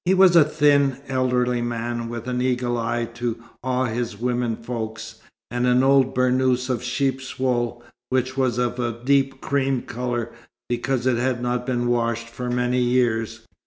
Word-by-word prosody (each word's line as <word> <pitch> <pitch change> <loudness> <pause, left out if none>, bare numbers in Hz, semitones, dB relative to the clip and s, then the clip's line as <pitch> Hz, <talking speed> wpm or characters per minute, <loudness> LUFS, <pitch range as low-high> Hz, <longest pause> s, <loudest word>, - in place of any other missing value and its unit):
He 185 +2 +4
was 185 -2 +6
a 165 - +9
thin, 145 -3 +3
elderly 125 -2 +1
man, 120 0 -3
with 120 0 -6
an 125 0 -1
eagle 125 -1 0
eye 120 0 -1
to 120 -1 -3 0.3
awe 130 0 0
his 115 -2 -3
women 120 -1 0
folk, 115 -1 -5 0.5
and 120 +1 0
an 125 +1 +4
old 135 -1 +4
burnous 130 0 +2
of 120 - -1
sheep's 130 +1 -2
wool, 120 -2 -1 0.3
which 130 0 0
was 130 -3 +1
of 125 0 -1
a 120 -1 -1
deep 135 0 +2
cream 135 -2 0
colour 120 -1 -3 0.4
because 120 +1 -1
it 130 -2 +2
had 125 0 0
not 125 0 -1
been 120 -2 0
washed 115 -1 0
for 125 +1 -5
many 125 +1 +1
years. 115 -3 +1
125 Hz, 165 wpm, -23 LUFS, 120-130 Hz, 0.5 s, a